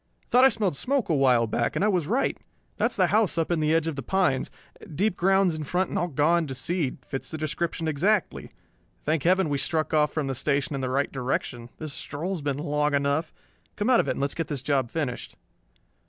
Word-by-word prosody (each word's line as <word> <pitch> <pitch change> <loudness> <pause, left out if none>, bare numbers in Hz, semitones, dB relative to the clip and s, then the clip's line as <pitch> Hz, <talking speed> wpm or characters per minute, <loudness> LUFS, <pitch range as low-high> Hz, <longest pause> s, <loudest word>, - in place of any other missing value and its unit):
"Thought 250 +2 +6
I - - +8
smelled 205 - -1
smoke 260 - 0
a - - +3
while 130 -4 +4
back, 115 +1 -1
and 200 - +1
I - - +4
was 180 -7 +1
right. 245 +7 +1 0.4
That's 230 +3 +1
the 185 - +3
house 215 -5 +2
up 165 +1 0
in 170 - +1
the 155 0 +1
edge 165 0 +2
of 165 -2 -2
the 135 - -4
pines. 160 -7 +1 0.5
Deep 200 +3 +1
grounds 190 0 +3
in 155 -1 -4
front 180 +5 -1
and - - -1
all 175 - 0
gone 160 +2 +2
to 135 - -5
seed; 140 +3 -1
fits 135 -2 -5
the 160 - -5
description 160 +2 -2
exactly. 180 +6 0 0.5
Thank 155 0 0
Heaven 185 +3 +3
we 145 -1 -1
struck 155 +3 -1
off 150 -1 +3
from 155 -3 -2
the 135 - -2
station 140 +2 0
in 135 - -3
the 130 - -2
right 140 +2 0
direction. 125 -2 -3
This 155 -3 -5
stroll 155 +7 -4
has 185 -5 -3
been 140 -2 -2
long 150 -1 0
enough. 140 +3 0 0.4
Come 210 +4 +1
out 245 - +6
of - - +1
it - - +1
and - - -7
let's 140 0 0
get 165 -3 -3
this 140 -4 -4
job 135 -4 +1
finished." 140 -5 -4
155 Hz, 230 wpm, -26 LUFS, 140-180 Hz, 0.5 s, I